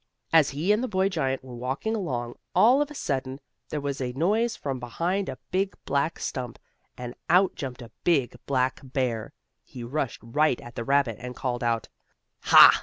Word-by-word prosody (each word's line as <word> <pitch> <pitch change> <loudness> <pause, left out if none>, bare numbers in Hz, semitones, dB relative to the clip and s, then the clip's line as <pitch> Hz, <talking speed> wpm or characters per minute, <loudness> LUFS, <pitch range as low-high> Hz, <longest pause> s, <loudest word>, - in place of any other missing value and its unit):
As 160 -4 +6
he 155 +8 0
and 215 +4 +2
the - - 0
boy 190 -2 +1
giant 135 -7 -1
were 130 -1 -10
walking 130 - -2
along, 120 - -3 0.2
all 250 +6 +6
of 295 - 0
a 295 - -10
sudden 135 - -2 0.3
there 150 - -2
was 140 -1 -3
a 125 -1 -2
noise 215 - +1
from 135 -3 -4
behind 175 +11 -1
a - - -5
big, 190 +1 0
black 140 +4 0
stump, 125 -3 -4 0.4
and 125 -1 -6 0.2
out 180 +3 +5
jumped 130 -4 -6
a 115 - -12
big, 140 -9 +2
black 130 -1 +1
bear. 125 -5 -2 0.3
He 125 - -9
rushed 135 +1 -3
right 130 +3 +2
at 120 - -11
the 115 - -4
rabbit, 135 -4 +2
and 125 +1 -7
called 125 -2 -2
out: 115 -1 0 0.6
"Ha! - - +9
135 Hz, 185 wpm, -27 LUFS, 125-175 Hz, 0.6 s, Ha